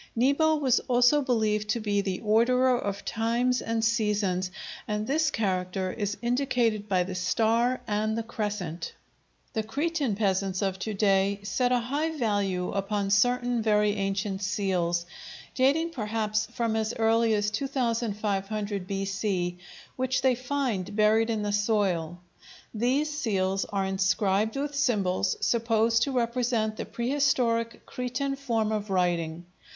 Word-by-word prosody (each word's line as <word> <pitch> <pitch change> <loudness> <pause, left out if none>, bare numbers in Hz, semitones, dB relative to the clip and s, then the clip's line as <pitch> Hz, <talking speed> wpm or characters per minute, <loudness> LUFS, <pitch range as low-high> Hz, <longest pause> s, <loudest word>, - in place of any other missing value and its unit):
Nebo 280 +6 +3
was 270 -5 +2
also 250 +4 +4
believed 215 -5 0
to 235 - +1
be 205 -2 0
the 190 -2 -3
orderer 250 +4 +3
of 200 -4 -4
times 235 +2 0
and 225 0 -1
seasons, 210 -5 0 0.4
and 210 0 -2
this 310 +5 +1
character 185 -3 -1
is 205 -2 -3
indicated 235 -4 0
by 185 -2 +2
the 185 +1 -6
star 230 +7 +1
and 215 +1 -1
the 230 - -1
crescent. 205 -7 -4 0.6
The 220 - 0
Cretan 280 +1 -1
peasants 195 -2 0
of 190 -1 -1
to 215 +1 -3
day 195 0 +2
set 245 +5 0
a 250 - +4
high 290 +7 -2
value 200 -6 0
upon 200 0 -1
certain 245 +3 +2
very 210 -1 +3
ancient 195 -1 -2
seals—dating 200 - -1
perhaps 215 -4 -1
from 230 -1 -2
as 220 +1 -1
early 225 0 +3
as 210 0 0
2500 215 -5 -2
B.C.—which 195 +5 -3
they 260 -1 +4
find 245 -7 -2
buried 220 +1 +3
in 220 -2 -1
the 205 0 -1
soil. 195 -6 0 0.5
These 265 +7 0
seals 195 -7 0
are 195 -1 -2
inscribed 195 +2 +1
with 290 +1 -2
symbols 200 -9 +1
supposed 230 -1 +2
to 275 - +1
represent 235 -3 0
the - - -4
prehistoric 235 -3 0
Cretan 255 +2 -3
form 230 -6 -1
of 210 -1 -2
writing. 175 -3 0
215 Hz, 135 wpm, -27 LUFS, 195-245 Hz, 0.6 s, also